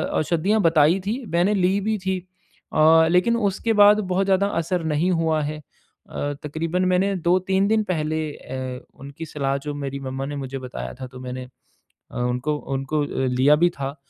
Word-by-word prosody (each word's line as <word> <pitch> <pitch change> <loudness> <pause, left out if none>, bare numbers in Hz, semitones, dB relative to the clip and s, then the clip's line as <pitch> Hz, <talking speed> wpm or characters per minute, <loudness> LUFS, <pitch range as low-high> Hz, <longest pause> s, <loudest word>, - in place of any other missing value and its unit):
औषधियाँ 180 +7 +1
बताई 165 +1 +4
थी। 240 +6 -2
मैंने 180 +5 +3
ली 190 +1 +2
भी 215 +2 0
थी। 190 0 -2 0.5
अ, 160 +1 +6
लेकिन 180 +7 +3
उसके 215 +1 0
बाद 210 +1 +6
बहुत 195 +2 +1
ज़्यादा 195 0 +2
असर 170 +1 -2
नहीं 170 +5 +1
हुआ 160 -2 +1
है। 150 +1 -3
अ, 145 0 -8
तक़रीबन 165 +4 -1
मैंने 185 +2 +2
2-3 190 +2 +2
दिन 220 0 +2
पहले 155 -2 -1
ए 130 -2 -6 0.2
उनकी 140 +4 -8
सलाह 140 -2 -1
जो 150 - -3
मेरी 140 -1 -4
मम्मा 135 0 -4
ने 145 +1 -5
मुझे 135 -1 -5
बताया 60 - -6
था 130 - -5
तो 125 0 -12
मैंने 130 0 -6 0.7
अ, - - -11
उनको 125 +5 -1 0.2
उनको 135 +3 -1 0.3
लिया 130 +4 +4
भी 175 +2 +3
था। 135 0 -3
160 Hz, 175 wpm, -23 LUFS, 140-185 Hz, 0.7 s, अ